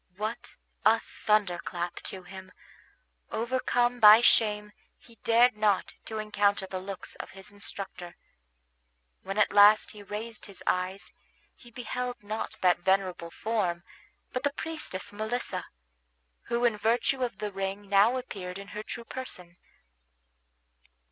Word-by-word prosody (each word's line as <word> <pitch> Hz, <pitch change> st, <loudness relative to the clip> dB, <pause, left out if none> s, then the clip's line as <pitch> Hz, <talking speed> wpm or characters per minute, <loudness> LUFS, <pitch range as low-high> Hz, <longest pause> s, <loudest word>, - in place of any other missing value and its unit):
What 215 Hz, +3 st, -4 dB, 0.3 s
a 225 Hz, +1 st, +5 dB
thunderclap 180 Hz, -6 st, -1 dB
to 190 Hz, -1 st, -5 dB
him! 190 Hz, +1 st, -11 dB, 0.8 s
Overcome 245 Hz, 0 st, 0 dB
by 215 Hz, +1 st, +10 dB
shame, 210 Hz, -3 st, +3 dB, 0.3 s
he 230 Hz, -2 st, -20 dB
dared 235 Hz, +1 st, +5 dB
not 210 Hz, -2 st, +1 dB
to 220 Hz, -, -5 dB
encounter 205 Hz, -2 st, +1 dB
the 190 Hz, 0 st, -5 dB
looks 195 Hz, 0 st, -7 dB
of -, -, -7 dB
his 190 Hz, +2 st, -8 dB
instructor. 195 Hz, -3 st, -7 dB, 1.1 s
When 195 Hz, +2 st, -5 dB
at 210 Hz, -, +3 dB
last 205 Hz, +1 st, +7 dB
he 210 Hz, -, -11 dB
raised 215 Hz, +3 st, -6 dB
his 200 Hz, -2 st, -9 dB
eyes 185 Hz, +2 st, -1 dB, 0.4 s
he 240 Hz, -, -16 dB
beheld 245 Hz, 0 st, -4 dB
not 215 Hz, +2 st, -4 dB
that 180 Hz, -1 st, +4 dB
venerable 185 Hz, -2 st, +1 dB
form, 185 Hz, -4 st, -1 dB, 0.5 s
but 255 Hz, -, -1 dB
the 285 Hz, 0 st, 0 dB
priestess 305 Hz, -13 st, -5 dB
Melissa, 220 Hz, +4 st, -3 dB, 0.8 s
who 235 Hz, +1 st, 0 dB
in 230 Hz, -3 st, +3 dB
virtue 235 Hz, +5 st, +1 dB
of 240 Hz, -6 st, -2 dB
the 210 Hz, -1 st, -4 dB
ring 195 Hz, +1 st, -4 dB
now 205 Hz, +5 st, +5 dB
appeared 185 Hz, -7 st, -6 dB
in 200 Hz, 0 st, -9 dB
her 210 Hz, -, -5 dB
true 235 Hz, +2 st, -7 dB
person. 180 Hz, -10 st, -7 dB
210 Hz, 135 wpm, -29 LUFS, 190-230 Hz, 1.1 s, by